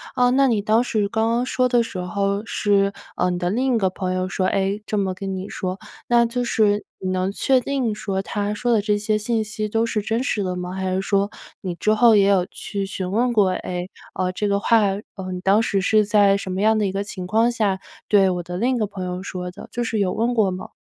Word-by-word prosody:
呃， 250 Hz, -1 st, +4 dB
那 275 Hz, +1 st, +4 dB
你 220 Hz, -5 st, +1 dB
当 220 Hz, +3 st, +3 dB
时， 215 Hz, -4 st, 0 dB
刚 220 Hz, +2 st, 0 dB
刚 240 Hz, +2 st, +1 dB
说 255 Hz, 0 st, +1 dB
的 240 Hz, -1 st, +4 dB
时 225 Hz, -4 st, -5 dB
候， 200 Hz, +3 st, -1 dB
是， 200 Hz, -2 st, +1 dB, 0.2 s
呃， 180 Hz, -, +1 dB
你 175 Hz, -, -2 dB
的 175 Hz, -1 st, 0 dB
另 255 Hz, +4 st, +1 dB
一 -, -, +3 dB
个 190 Hz, -3 st, +2 dB
朋 185 Hz, 0 st, -3 dB
友 185 Hz, 0 st, -1 dB
说， 185 Hz, +1 st, -1 dB
哎， 195 Hz, +2 st, 0 dB
这 215 Hz, -, -2 dB
么 195 Hz, -2 st, 0 dB
跟 195 Hz, +1 st, -5 dB
你 190 Hz, +1 st, -5 dB
说， 185 Hz, 0 st, -4 dB, 0.3 s
那 240 Hz, -1 st, +4 dB
就 245 Hz, +1 st, -2 dB
是 210 Hz, -3 st, +2 dB, 0.2 s
你 185 Hz, -, -3 dB
能 185 Hz, +1 st, 0 dB
确 260 Hz, +5 st, +2 dB
定 255 Hz, -5 st, -1 dB
说， 195 Hz, -2 st, -2 dB
他 205 Hz, +1 st, -2 dB
说 240 Hz, +3 st, 0 dB
的 215 Hz, -, +3 dB
这 210 Hz, 0 st, +1 dB
些 210 Hz, +1 st, 0 dB
信 220 Hz, +1 st, -1 dB
息 215 Hz, 0 st, -4 dB
都 225 Hz, +2 st, +1 dB
是 220 Hz, -2 st, -1 dB
真 225 Hz, +4 st, -1 dB
实 210 Hz, -7 st, -1 dB
的 180 Hz, -1 st, -2 dB
吗？ 180 Hz, 0 st, -5 dB
还 190 Hz, -1 st, -2 dB
是 190 Hz, -, 0 dB
说， 200 Hz, +1 st, +1 dB, 0.3 s
你 180 Hz, -3 st, -4 dB
之 215 Hz, +5 st, +1 dB
后 225 Hz, 0 st, +6 dB
也 200 Hz, -1 st, +5 dB
有 190 Hz, -3 st, +3 dB
去 200 Hz, -1 st, -5 dB
询 190 Hz, -1 st, -4 dB
问 240 Hz, +4 st, +2 dB
过： 205 Hz, -4 st, +4 dB
“哎， 180 Hz, 0 st, -4 dB, 0.3 s
呃， 185 Hz, 0 st, 0 dB
这 210 Hz, +3 st, -2 dB
个 200 Hz, 0 st, +1 dB
话， 230 Hz, +2 st, +4 dB, 0.4 s
呃， 185 Hz, -1 st, -6 dB
你 180 Hz, -, -4 dB
当 195 Hz, +4 st, +4 dB
时 200 Hz, -3 st, 0 dB
是 215 Hz, +2 st, +3 dB
在 205 Hz, -1 st, +4 dB
什 190 Hz, -2 st, -5 dB
么 190 Hz, +2 st, -2 dB
样 220 Hz, +1 st, +4 dB
的 210 Hz, -, +1 dB
一 -, -, -2 dB
个 195 Hz, +1 st, -2 dB
情 185 Hz, -3 st, -7 dB
况 225 Hz, +4 st, +3 dB
下， 205 Hz, -5 st, 0 dB, 0.3 s
对 195 Hz, -2 st, +4 dB
我 180 Hz, -1 st, -1 dB
的 180 Hz, +1 st, -5 dB
另 250 Hz, +5 st, +1 dB
一 240 Hz, -, -1 dB
个 210 Hz, -, 0 dB
朋 190 Hz, -2 st, -6 dB
友 180 Hz, 0 st, -4 dB
说 180 Hz, -2 st, -5 dB
的？” 180 Hz, -, -11 dB
就 240 Hz, -, -2 dB
是 225 Hz, -2 st, -1 dB
有 190 Hz, -2 st, +1 dB
问 235 Hz, +3 st, 0 dB
过 215 Hz, -5 st, +3 dB
吗？ 185 Hz, -, -6 dB
205 Hz, 275 characters per minute, -22 LUFS, 190-225 Hz, 0.4 s, 后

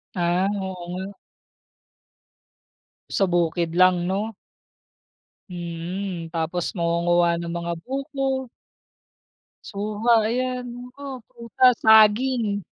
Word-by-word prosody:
Ah, 175 Hz, +2 st, +1 dB
oo 185 Hz, -2 st, -6 dB
nga. 190 Hz, +2 st, -5 dB, 2.0 s
Sa 195 Hz, -, +2 dB
bukid 170 Hz, -1 st, 0 dB
lang 180 Hz, -1 st, +4 dB
no. 205 Hz, +4 st, -2 dB, 1.2 s
Hmm, 175 Hz, 0 st, -5 dB
tapos 170 Hz, +3 st, -3 dB
mangunguwa 170 Hz, 0 st, +2 dB
ng 170 Hz, -, -5 dB
mga 170 Hz, 0 st, -3 dB
buko. 270 Hz, -, -3 dB, 1.2 s
Suha 210 Hz, +3 st, -1 dB, 0.2 s
ayan, 250 Hz, +1 st, -2 dB, 0.4 s
oo, 265 Hz, -2 st, -6 dB
prutas 235 Hz, +2 st, +2 dB
saging. 220 Hz, -1 st, +4 dB
190 Hz, 85 wpm, -23 LUFS, 175-230 Hz, 2.0 s, lang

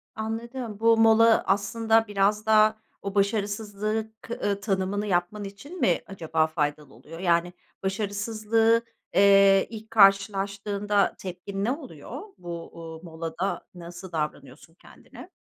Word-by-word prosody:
Anladım. 225 Hz, 0 st, -5 dB
Bu 230 Hz, 0 st, +4 dB
mola 225 Hz, 0 st, +5 dB
aslında 225 Hz, +3 st, +2 dB
biraz 205 Hz, +1 st, +1 dB
da 215 Hz, 0 st, +5 dB, 0.2 s
o 200 Hz, 0 st, -5 dB
başarısızlığı 210 Hz, +1 st, -1 dB
k 230 Hz, -, -6 dB
ııı, 200 Hz, -3 st, -2 dB
tanımını 200 Hz, 0 st, -1 dB
yapman 180 Hz, +3 st, -1 dB
için 205 Hz, -, -9 dB
mi -, -, +2 dB
acaba 160 Hz, -4 st, 0 dB
faydalı 150 Hz, -2 st, -3 dB
oluyor? 165 Hz, +2 st, -12 dB
Yani, 175 Hz, -1 st, +1 dB, 0.3 s
başarısızlığı, 215 Hz, +3 st, +1 dB, 0.3 s
eee, 195 Hz, 0 st, +6 dB
ilk 220 Hz, 0 st, -10 dB
karşılaştığında 200 Hz, 0 st, +2 dB
tepkin 195 Hz, +2 st, -6 dB
ne 230 Hz, -, +1 dB
oluyor? 290 Hz, +5 st, -7 dB, 0.2 s
Bu, 170 Hz, -1 st, -7 dB
uuu, 160 Hz, -1 st, -9 dB
molada 165 Hz, +2 st, -4 dB
nasıl 175 Hz, +1 st, -10 dB
davranıyorsun 150 Hz, -1 st, -5 dB
kendine? -, -, -15 dB
200 Hz, 120 wpm, -26 LUFS, 180-220 Hz, 0.3 s, eee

